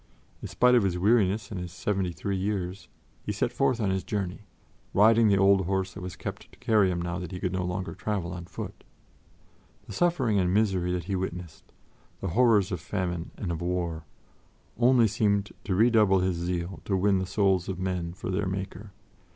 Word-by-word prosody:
In - - -5
spite 125 0 +3
of 120 - +6
his 95 -3 0
weariness 105 +1 +2
and 100 - -4
his 90 -1 -6
seventy 95 0 -1
three 95 +5 -3
years, 95 -1 -3 0.4
he - - -3
set - - -1
forth 125 - +1
on 100 -4 +1
his 95 0 -1
journey, 100 -1 -4 0.5
riding 110 +2 +6
the 100 -1 +4
old 95 -2 +4
horse 95 -1 -1
that 100 - -9
was 90 0 -6
kept 85 - -7
to - - -19
carry 105 -4 +3
him 90 -1 -1
now 90 +1 -3
that 90 0 -6
he 90 - -5
could 90 0 -2
no 95 -1 -1
longer 90 +1 -3
travel 100 -6 -3
on 90 -1 -7
foot. - - -8 1.0
The - - -9
suffering 135 - +2
and 90 -1 +1
misery 95 -4 +1
that 90 -1 -2
he 95 +3 -3
witnessed, 90 -3 -5 0.5
the 95 - -3
horrors 105 -1 +3
of 90 - -2
famine 90 -3 -3
and 90 - -3
of 85 -1 -4
war, 85 -3 -2 0.7
only 120 -1 +4
seemed 100 -1 0
to 95 - 0
redouble 105 -3 +4
his 90 -1 0
zeal 85 +1 -3
to 95 - 0
win 95 0 +3
the 95 - -3
souls 95 -3 +1
of 95 - -3
men 90 -2 -3
for 95 0 -5
their 95 +1 -1
Maker. 95 +1 -5
95 Hz, 200 wpm, -27 LUFS, 90-105 Hz, 1.0 s, of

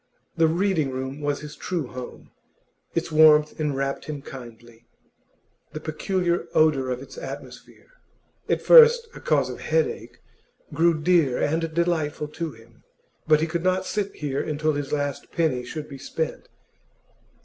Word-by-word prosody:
The 165 -1 +4
Reading 170 -3 +1
room 130 +2 -5
was 145 -1 -1
his 150 0 -9
true 175 -5 -3
home; 125 0 -9 0.6
its 165 -1 -1
warmth 155 -1 +5
enwrapped 135 -2 -2
him 145 -2 -6
kindly; 120 -2 -12 0.9
the 155 - -5
peculiar 175 +3 -1
odour 145 -5 +3
of 125 +1 -3
its - - -11
atmosphere - - -10 0.6
at - - 0
first 470 -1 +8
a - - -10
cause - - +1
of - - -7
headache 485 - -1 0.6
grew 165 -1 +3
dear 155 -6 +3
and 160 +2 0
delightful 160 -3 0
to 165 +2 -4
him. 115 -1 -19 0.4
But 155 -1 +5
he - - +2
could 165 +1 -3
not 185 0 +1
sit 205 -2 -3
here 140 -2 -2
until 155 0 -1
his 145 -1 -4
last 145 -2 -3
penny 150 -7 0
should 150 +4 -6
be 135 -2 -10
spent. 160 +3 -4
155 Hz, 150 wpm, -24 LUFS, 135-170 Hz, 0.9 s, first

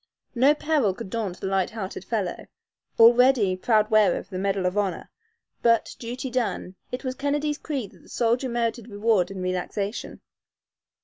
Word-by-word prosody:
No 270 +5 +4
peril 295 -11 +1
could 190 - -8
daunt 205 -6 -3
the - - -4
light 190 -1 +1
hearted 210 -4 -6
fellow, 205 -6 -3 0.5
already 235 -4 +6
proud 215 +3 +2
wearer 210 -4 +4
of 195 - -9
the 185 - -4
medal 195 -1 0
of 180 +1 0
honor; 195 -4 -2 0.5
but, 230 -1 +2
duty 250 +2 -5
done, 235 -6 -2 0.2
it 250 +2 -5
was 255 -1 -2
Kennedy's 290 +2 -1
creed 270 -10 -4
that - - -19
the - - -20
soldier 240 +2 0
merited 235 -1 -2
reward 205 -3 +1
and 190 -2 -6
relaxation. 185 +3 -3
225 Hz, 165 wpm, -25 LUFS, 195-250 Hz, 0.5 s, already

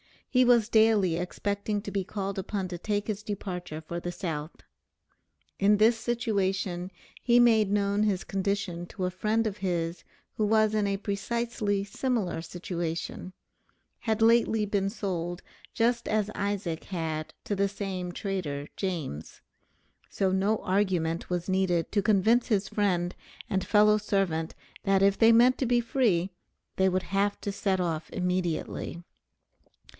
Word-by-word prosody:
He 255 -1 +4
was 235 -3 +4
daily 215 -7 +4
expecting 200 +3 -2
to 200 - -6
be 195 -2 -1
called 195 -1 -3
upon 190 -1 -3
to 175 - -5
take 205 +3 -2
his 210 -2 -2
departure 180 -6 -5
for 170 +2 -4
the 175 0 -5
South. 160 -3 -5 1.0
In 205 +1 +5
this 225 +3 +4
situation 195 -7 -1 0.3
he 240 -1 +4
made 225 -4 +5
known 200 0 +1
his 200 -3 +1
condition 195 -3 -2
to 190 - -6
a 180 - 0
friend 215 +4 0
of 210 -2 -2
his 170 -3 -2 0.3
who 215 - +2
was 215 0 +3
in 210 -1 +1
a 200 0 0
precisely 205 0 -1
similar 205 -5 -2
situation; 170 +1 -5 0.7
had 220 -1 -1
lately 225 -1 +4
been 200 -1 0
sold 175 -3 -4 0.3
just 235 +1 +1
as 215 -1 0
Isaac 200 -5 -2
had 160 -4 -4
to 205 - -2
the 200 0 +2
same 190 -3 -4
trader 175 -8 -3
James. 160 - -4 0.7
So 190 -1 0
no 200 +3 +1
argument 185 -4 0
was 180 0 -2
needed 185 -3 +1
to 205 - +2
convince 220 +4 +3
his 200 -4 +1
friend 180 -4 0 0.4
and 190 -1 0
fellow 210 0 +5
servant 190 -6 -1 0.3
that 195 -1 +3
if 200 0 +4
they 225 0 +6
meant 245 +3 +5
to 265 - +1
be 240 0 +3
free 220 -7 +1 0.5
they 190 - +4
would 185 0 0
have 200 +3 0
to 200 - -2
set 195 -1 0
off 165 -3 -2
immediately. 180 -1 -2
195 Hz, 150 wpm, -28 LUFS, 180-215 Hz, 1.0 s, they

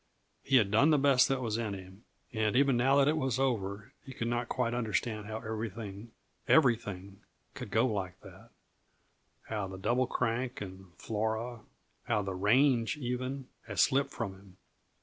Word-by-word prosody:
He 135 - +1
had 105 -6 +4
done 135 +9 +5
the 150 - +5
best 135 -2 +5
that 135 -1 -1
was 110 -1 -1
in 105 -4 -2
him, 95 +3 -12 0.3
and 110 -1 0
even 135 0 +4
now 130 +3 +3
that 140 -1 +5
it 155 +2 +2
was 130 -5 0
over 105 -6 -2
he 135 - -9
could 115 - -2
not 120 0 -1
quite 120 -2 0
understand 110 -2 -2
how 110 0 -4
everything, 110 -1 -6 0.4
everything 105 - +2 0.3
could - - -7
go - - +3
like 95 -6 -3
that; - - -14 0.9
how 105 -3 -3
the 95 0 -8
Double 120 +6 +1
Crank 125 +1 -1
and 95 -2 -9
Flora 110 +2 -2 0.5
how 110 -4 +1
the 95 0 -3
range, 115 +6 +3
even, 130 0 -3 0.2
had 105 -3 -6
slipped 135 - +3
from 105 -5 -4
him. 95 -1 -17
115 Hz, 170 wpm, -31 LUFS, 100-130 Hz, 0.9 s, done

